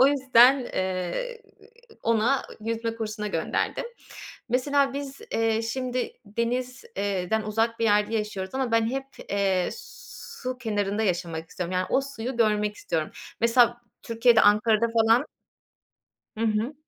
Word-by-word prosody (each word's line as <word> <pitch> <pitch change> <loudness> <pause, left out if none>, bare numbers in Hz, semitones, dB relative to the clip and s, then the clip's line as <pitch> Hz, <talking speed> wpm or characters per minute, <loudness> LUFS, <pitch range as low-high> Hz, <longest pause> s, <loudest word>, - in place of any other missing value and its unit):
O 260 - +8
yüzden, 265 -2 +6
eee, 190 - -3 0.6
ona 230 +4 +2 0.2
yüzme 230 +1 -2
kursuna 215 -1 -4
gönderdim. 165 - -1 0.6
Mesela, 275 +3 +2
biz, 280 -1 -6
iii, 225 0 +1
şimdi 250 +2 -2
deniz 245 - -3
eee, 195 -3 -2
den 220 0 +2
uzak 225 +2 0
bir 230 - 0
yerde 210 +1 +3
yaşıyoruz 210 -3 -3
ama 265 -3 -1
ben 230 -1 +3
hep, 270 +1 -3 0.2
eee, 195 -2 +1
su 475 - -8
kenarında 210 -2 -1
yaşamak 170 -4 -2
istiyorum. 180 0 -4
Yani, 185 0 0
o - - +3
suyu 265 -2 -5
görmek 210 -2 +2
istiyorum. 160 -2 -2 0.3
Mesela, 240 0 +4 0.2
Türkiye'de, 230 0 +4
Ankara'da 215 +2 +4
falan 230 +3 +4 1.1
Hı 230 - 0
hı. 220 +6 0
225 Hz, 130 wpm, -26 LUFS, 210-255 Hz, 1.1 s, O